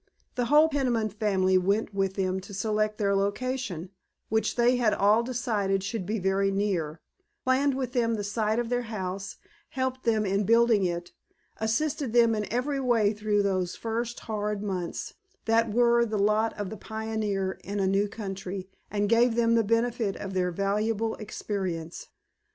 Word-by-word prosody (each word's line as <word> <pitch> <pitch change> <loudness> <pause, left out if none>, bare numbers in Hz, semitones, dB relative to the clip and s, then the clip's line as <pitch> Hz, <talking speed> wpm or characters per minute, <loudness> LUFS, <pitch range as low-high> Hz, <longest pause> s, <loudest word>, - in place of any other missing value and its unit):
The 245 - -1
whole 300 +5 +6
Peniman 250 -7 0
family 190 -3 +2
went 200 +3 0
with 195 -1 0
them 190 -1 0
to 195 +1 -10
select 215 +1 0
their 200 -1 +1
location, 200 -3 -2 0.4
which 220 +1 +1
they 245 +1 +3
had 230 -3 +2
all 210 +3 +4
decided 220 -6 -1
should 200 -2 -3
be 220 +2 -1
very 195 0 +1
near, 185 -6 -1 0.4
planned 265 +1 +2
with 260 -2 -3
them 230 -3 +1
the 210 - -3
site 215 +1 0
of 240 -1 -1
their 245 0 +1
house, 195 -2 -4 0.3
helped 260 0 -2
them 220 -3 +1
in 195 +1 +1
building 230 -1 +4
it, 175 0 -3 0.5
assisted 250 +3 -1
them 235 -1 +5
in 210 -1 -3
every 270 +4 0
way 230 -5 +2
through 210 -1 +1
those 185 -3 0
first 230 +1 -3
hard 210 -1 -3
months 185 -4 -4 0.3
that 225 +1 +3
are 235 0 +5
the 220 -2 -2
lot 215 +2 +2
of 205 -3 -4
the 220 - -6
pioneer 215 -4 -3
in 205 +1 -4
a 195 - +2
new 195 +2 +2
country, 195 -2 -6 0.2
and 205 0 0
gave 230 +2 +4
them 230 -1 +3
the 230 -1 +4
benefit 230 -1 0
of 195 -1 -6
their 180 -1 +1
valuable 210 +4 0
experience. 185 -6 -4
215 Hz, 170 wpm, -27 LUFS, 195-230 Hz, 0.5 s, whole